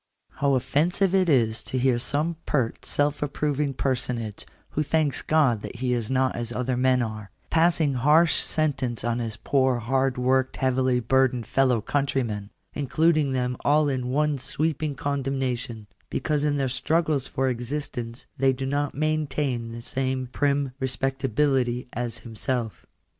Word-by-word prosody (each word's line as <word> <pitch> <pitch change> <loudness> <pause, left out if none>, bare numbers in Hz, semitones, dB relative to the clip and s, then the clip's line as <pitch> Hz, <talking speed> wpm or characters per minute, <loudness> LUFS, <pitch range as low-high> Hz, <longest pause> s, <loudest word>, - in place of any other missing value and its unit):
How 140 -1 +2
offensive 175 +9 +1
is 135 -13 +3
it - - -18
to 130 - -2
hear 125 -1 +2
some 155 +6 -1
pert, 125 -6 -1
self 145 0 +1
approving 145 -1 -1
per 135 - +1
sonage, 120 -4 -4 0.2
who 150 - -1
thanks 150 -2 +1
God 140 -9 +2
that - - -7
he 125 +1 -1
is 115 -3 -2
not 130 -1 +1
as 120 0 -3
other 125 +1 -1
men 125 0 +3
are, 110 -3 -6 0.2
'passing 160 -3 +3
harsh 150 +6 +4
sentence 135 -7 -1
on 120 +1 0
his 115 -2 -4
poor 130 0 +2
hard 130 +2 0
worked 130 +1 +1
heavily 130 -1 +2
bur 130 +2 +4
dened 120 -3 -5
fellow 130 -4 +2
countrymen; 120 -5 -1 0.2
including 150 0 +2
them 125 -1 0
all 150 0 +3
in 130 -2 -2
one 150 +1 +1
sweep, 155 +3 -2
ing 150 -2 -2
condemnation, 130 -5 -2 0.2
because 150 -3 -1
in 145 -1 +1
their 135 -1 +1
struggles 145 +2 0
for 135 0 -1
existence 120 -1 -4
they 135 0 +4
do 135 +1 -4
not 145 +1 -1
maintain 145 -5 -1
the 115 0 -8
same 130 0 -2
prim 140 +1 0
respectability 135 -1 0
as 120 0 -3
himself. 115 0 -3
130 Hz, 155 wpm, -25 LUFS, 125-145 Hz, 0.2 s, harsh